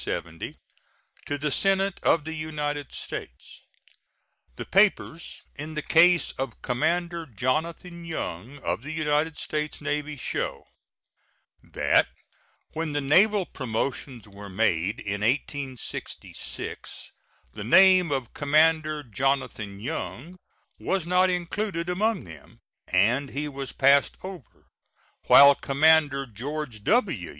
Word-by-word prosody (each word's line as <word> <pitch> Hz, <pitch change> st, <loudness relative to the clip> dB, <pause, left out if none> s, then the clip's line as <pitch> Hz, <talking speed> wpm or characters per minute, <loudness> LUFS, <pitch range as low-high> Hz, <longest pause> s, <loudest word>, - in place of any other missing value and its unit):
To 145 Hz, -, -2 dB
the 150 Hz, 0 st, -1 dB
Senate 195 Hz, +3 st, +1 dB
of 160 Hz, -3 st, +2 dB
the 160 Hz, -, -4 dB
United 150 Hz, -3 st, -4 dB
States: -, -, -8 dB, 0.9 s
The -, -, -6 dB
papers 190 Hz, -5 st, +1 dB
in 155 Hz, +1 st, -7 dB
the 150 Hz, -, -3 dB
case 175 Hz, +1 st, +4 dB
of 135 Hz, -3 st, -5 dB
Commander 170 Hz, +6 st, -1 dB
Jonathan 160 Hz, -, -3 dB
Young, 135 Hz, -, -5 dB
of -, -, -1 dB
the 145 Hz, +4 st, -7 dB
United 155 Hz, 0 st, 0 dB
States 150 Hz, 0 st, -3 dB
Navy, 150 Hz, 0 st, -3 dB
show -, -, -3 dB, 1.0 s
That -, -, +2 dB, 0.7 s
when 160 Hz, -1 st, -3 dB
the 145 Hz, -, 0 dB
naval 190 Hz, +8 st, +4 dB
promotions 125 Hz, -2 st, -4 dB
were 100 Hz, 0 st, -11 dB
made 100 Hz, +1 st, 0 dB
in 100 Hz, 0 st, -3 dB
1866 130 Hz, +2 st, -4 dB, 0.4 s
the 105 Hz, -, -7 dB
name 185 Hz, -, +6 dB
of 130 Hz, -4 st, -2 dB
Commander 155 Hz, +1 st, +2 dB
Jonathan 115 Hz, -4 st, -2 dB
Young 160 Hz, -, -5 dB, 0.4 s
was 190 Hz, -4 st, -1 dB
not 180 Hz, +1 st, +3 dB
included 180 Hz, 0 st, -2 dB
among 210 Hz, +3 st, 0 dB
them, 80 Hz, -5 st, -14 dB, 0.3 s
and 115 Hz, +10 st, +2 dB
he 150 Hz, +2 st, -3 dB
was 135 Hz, -2 st, -6 dB
passed 140 Hz, +1 st, +3 dB
over, 185 Hz, -, -10 dB, 0.6 s
while 140 Hz, 0 st, +9 dB
Commander 145 Hz, 0 st, +3 dB
George 125 Hz, 0 st, -6 dB
W. 185 Hz, -, +1 dB
150 Hz, 110 wpm, -26 LUFS, 130-170 Hz, 1.0 s, while